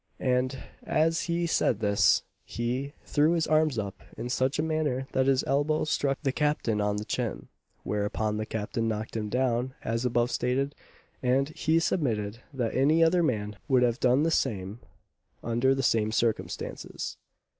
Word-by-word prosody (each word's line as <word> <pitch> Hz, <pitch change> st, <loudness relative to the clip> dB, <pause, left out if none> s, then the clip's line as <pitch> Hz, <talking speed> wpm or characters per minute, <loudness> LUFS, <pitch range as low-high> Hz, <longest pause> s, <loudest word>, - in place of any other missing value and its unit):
and 130 Hz, +1 st, 0 dB, 0.2 s
as 160 Hz, +1 st, +1 dB
he 170 Hz, 0 st, +1 dB
said 120 Hz, -9 st, +1 dB
this 105 Hz, -2 st, +3 dB, 0.2 s
he 125 Hz, +4 st, -3 dB
threw 150 Hz, +3 st, +3 dB
his 165 Hz, -2 st, +1 dB
arms 155 Hz, -4 st, +2 dB
up 100 Hz, -2 st, -4 dB, 0.2 s
in 120 Hz, -, -4 dB
such 130 Hz, +2 st, +1 dB
a 155 Hz, -, +1 dB
manner 150 Hz, -5 st, -1 dB
that 130 Hz, 0 st, +1 dB
his 135 Hz, -1 st, +3 dB
elbow 145 Hz, +3 st, +1 dB
struck 140 Hz, -2 st, 0 dB
the 135 Hz, -, +1 dB
Captain 130 Hz, -7 st, 0 dB
on 105 Hz, 0 st, +1 dB
the 105 Hz, +1 st, -4 dB
chin; -, -, -3 dB, 0.3 s
whereupon 105 Hz, +1 st, -1 dB
the 110 Hz, -, -2 dB
Captain 110 Hz, +1 st, -2 dB
knocked 110 Hz, 0 st, -3 dB
him 105 Hz, -2 st, -2 dB
down, 125 Hz, +1 st, 0 dB
as 115 Hz, +1 st, -1 dB
above 120 Hz, 0 st, +1 dB
stated; 135 Hz, +3 st, 0 dB, 0.5 s
and 135 Hz, +2 st, +2 dB
he 160 Hz, +1 st, +1 dB
submitted 115 Hz, -, 0 dB
that 125 Hz, -5 st, -2 dB
any 150 Hz, +5 st, +4 dB
other 175 Hz, +2 st, +4 dB
man 105 Hz, -9 st, -1 dB
would 130 Hz, -2 st, +4 dB
have 120 Hz, 0 st, +1 dB
done 130 Hz, +3 st, +3 dB
the 165 Hz, -, +2 dB
same 105 Hz, -7 st, -1 dB, 0.6 s
under 120 Hz, +3 st, +2 dB
the 135 Hz, -, -1 dB
same 110 Hz, -3 st, +2 dB
circumstances. 115 Hz, 0 st, -2 dB
130 Hz, 165 wpm, -28 LUFS, 110-145 Hz, 0.6 s, any